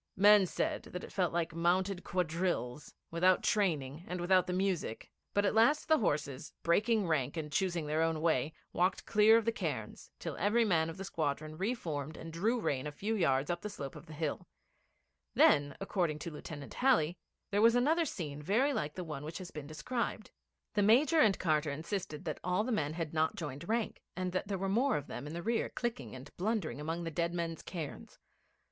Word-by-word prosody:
Men 205 0 +7
said - - -1
that 180 - -5
it - - -9
felt 185 -4 +1
like 170 -1 -1
mounted 180 +3 +1
quadrilles 170 -6 -2 0.2
without 180 +2 +3
training 155 -7 0
and 180 0 -4
without 185 +1 +3
the - - -1
music; 180 - -1 0.2
but 205 0 +3
at - - +2
last 235 +8 +4
the 315 -1 +5
horses, 145 - -1
breaking 210 +4 +2
rank 145 -2 0
and 150 -2 -4
choosing 175 -1 0
their 155 +2 0
own 165 -1 +1
way, 155 -3 +1 0.2
walked 180 +2 +1
clear 215 +2 +6
of 230 - 0
the 230 - +3
cairns, - - -4
till - - -5
every 225 +3 +3
man 165 -5 +2
of 165 - -7
the 195 - -5
squadron 155 -3 -2
re 200 +9 -1
formed 155 - -5
and 165 0 -8
drew 220 +9 +1
rein 140 -9 -1
a - - -4
few 205 +9 -2
yards 140 -6 +2
up 175 - -3
the 210 - -4
slope 140 -10 -7
of 150 +3 -11
the 155 - -9
hill. 155 -1 -3 0.9
Then, 145 0 +4
according 180 -6 -1
to 170 - -5
Lieutenant 150 -1 -8
Halley, 180 - +2 0.3
there 205 +1 +2
was 230 +1 +6
another 315 +7 +3
scene 150 - -5
very 235 - +2
like 150 - -2
the 185 - -4
one 150 -4 -6
which 160 +2 -5
has 185 -2 -8
been 150 -2 -7
described. 215 +8 -3 0.4
The 210 - +2
Major 265 +10 +5
and 210 -9 +5
Carter 155 -3 +1
insisted 160 +2 -4
that 155 - -3
all 180 +3 +1
the 250 - -2
men 155 -9 0
had 165 -2 -4
not 160 0 +1
joined 150 +1 -6
rank, 230 0 -1
and 185 0 -2
that 185 +2 -2
there 200 -1 -1
were 195 +1 -2
more 245 +8 +2
of 145 - -5
them 140 +1 -6
in 150 - -6
the 170 - -4
rear 230 +1 0
clicking 140 - -4
and 130 +3 -11
blundering 180 - -1
among 165 +3 -3
the 165 - -3
dead 170 +2 -1
men's 165 -1 -3
cairns. 165 -6 -7
175 Hz, 205 wpm, -33 LUFS, 155-205 Hz, 0.9 s, Men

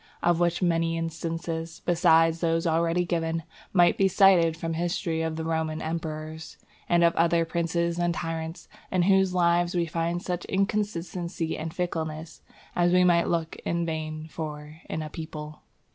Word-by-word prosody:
Of 175 -1 +3
which 175 +1 +1
many 165 -1 +1
instances, 165 0 -4
besides 165 -1 +4
those 165 -1 +1
already 165 +2 +2
given, 165 -1 -1 0.3
might 175 -2 +4
be 195 - +5
cited 180 -4 +5
from 165 0 -3
the 165 - -3
history 170 -1 -1
of 160 -1 -2
the 160 0 -4
Roman 160 -1 -1
emperors, 160 -1 -5 0.3
and 170 0 +4
of 170 0 +4
other 165 0 +3
princes 170 +1 -1
and 175 0 +2
tyrants, 165 0 -4 0.2
in 185 -2 +2
whose 190 0 +3
lives 175 0 +2
we 170 -1 +2
find 165 +1 -1
such 180 -1 -3
inconstancy 185 -4 -1
and 160 +1 -4
fickleness, 160 -2 -4 0.3
as 175 0 +3
we 180 0 +5
might 170 -1 +4
look 165 -1 -1
in 170 0 -2
vain 155 -1 -4
for 155 0 -7
in 160 - -3
a 155 - -6
people. 155 -1 -7
165 Hz, 160 wpm, -27 LUFS, 160-175 Hz, 0.3 s, be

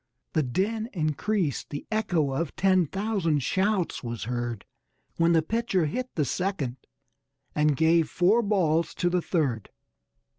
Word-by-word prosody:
The 155 - +3
din 210 - -1
increased, 165 - -1
the 145 - -6
echo 180 -10 +1
of 150 +3 -2
ten 185 -3 +3
thousand 190 - 0
shouts 190 - 0
was 120 -2 -4
heard 120 -2 -3 0.5
When 165 0 +4
the 165 -1 +4
pitcher 225 -2 0
hit 250 - -3
the 150 - +1
second 150 -6 -2 0.8
and 150 -2 +2
gave 160 0 +3
"four 195 +7 +3
balls" 170 -7 +1
to 175 0 0
the 180 0 +2
third. 140 - -1
170 Hz, 140 wpm, -27 LUFS, 145-195 Hz, 0.8 s, When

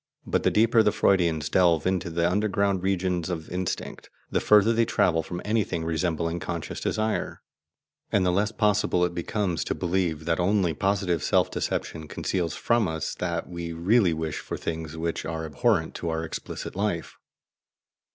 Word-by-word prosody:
But - - 0
the - - +3
deeper 115 +1 +4
the 105 - +3
Freudians 85 -8 +2
delve 85 -1 +3
into 95 -1 0
the 85 +1 +1
underground 100 0 +1
regions 95 -2 0
of 80 -3 -5
instinct, 90 0 -4 0.2
the - - +2
further 105 +2 +5
they 115 +1 +3
travel 90 -7 +2
from 90 +2 -6
anything 105 -6 0
resembling 85 0 -1
conscious 85 -2 -4
desire, 110 0 -2 0.7
and 95 -2 +3
the 90 - +3
less 100 +4 +1
possible 105 -5 +2
it 85 - -3
becomes 90 -1 -1
to - - -1
believe 85 -3 -1
that 80 0 0
only 90 -2 +2
positive 95 -1 0
self - - +2
deception 80 -1 -3
conceals 85 +1 -2
from 115 -4 +2
us 80 -1 -3
that 85 -2 -3
we 85 -1 -5
really 95 +3 +3
wish 80 -1 -3
for - - -5
things 80 -1 -5
which 85 0 -2
are 80 0 -4
abhorrent 80 - +1
to 85 - -3
our 80 0 -2
explicit 80 - -6
life. 95 -4 -2
90 Hz, 165 wpm, -26 LUFS, 80-100 Hz, 0.7 s, further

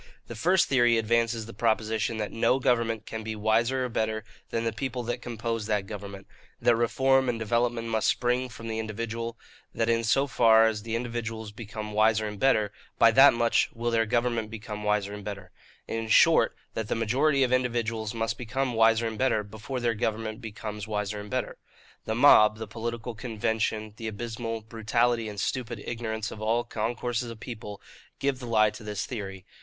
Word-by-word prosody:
The 120 - -8
first 175 +10 +3
theory 120 -3 +4
advances 115 0 +1
the 115 - -10
proposition 110 0 0
that 105 -1 -3
no 115 +3 +2
government 115 -4 +1
can 110 - -5
be 110 0 -4
wiser 115 +5 +1
or - - -3
better 110 -1 -1 0.3
than 115 - -1
the 115 -1 -1
people 125 +2 -3
that 120 +1 -3
compose 115 -2 -3
that 105 -2 0
government; 100 -1 -8 0.3
that 120 - +4
reform 130 +3 +2
and 120 - -1
development 115 +1 0
must 110 -1 0
spring 125 +1 +1
from 115 0 -9
the 110 0 -3
individual; 115 +1 -4 0.4
that 115 0 +1
in 115 0 +1
so 135 +5 +3
far 115 -4 +5
as 110 -2 0
the 115 +1 -3
individuals 115 -2 -4
become 105 0 -7
wiser 110 +1 +3
and 105 -1 -7
better, 110 -5 +3 0.3
by 115 - +6
that 135 +2 +7
much 115 0 +2
will 120 +1 -1
their 115 -1 +2
government 120 -1 0
become 105 -1 -7
wiser 105 -1 0
and 105 0 -7
better; 95 -3 -7 0.4
in 115 0 -3
short, - - +5 0.2
that 110 -2 -3
the - - -1
majority 135 +6 +2
of 125 -1 +1
individuals 115 -3 -1
must 115 0 -2
become 125 +2 -2
wiser 115 0 +4
and 110 -1 -4
better, 130 -5 +2
before 110 +5 -6
their 120 -1 +1
government 110 0 -3
becomes 105 -2 -6
wiser 105 -1 -2
and 105 0 -8
better. - - -2 0.5
The 110 - -1
mob, 110 -5 +7
the 110 - -5
political 115 +2 -5
convention, 110 -2 -2
the 115 - -5
abysmal 115 +1 -4
brutality 115 +1 0
and 105 -1 -7
stupid 120 0 -2
ignorance 110 -2 -3
of 110 - -9
all 115 +2 +1
concourses 120 +2 -2
of 115 -1 -9
people, 115 -5 -7 0.4
give 140 -2 -1
the 125 - -7
lie 110 -2 +4
to 115 - -11
this 105 -1 -3
theory. 95 -6 -6
115 Hz, 185 wpm, -27 LUFS, 110-120 Hz, 0.5 s, that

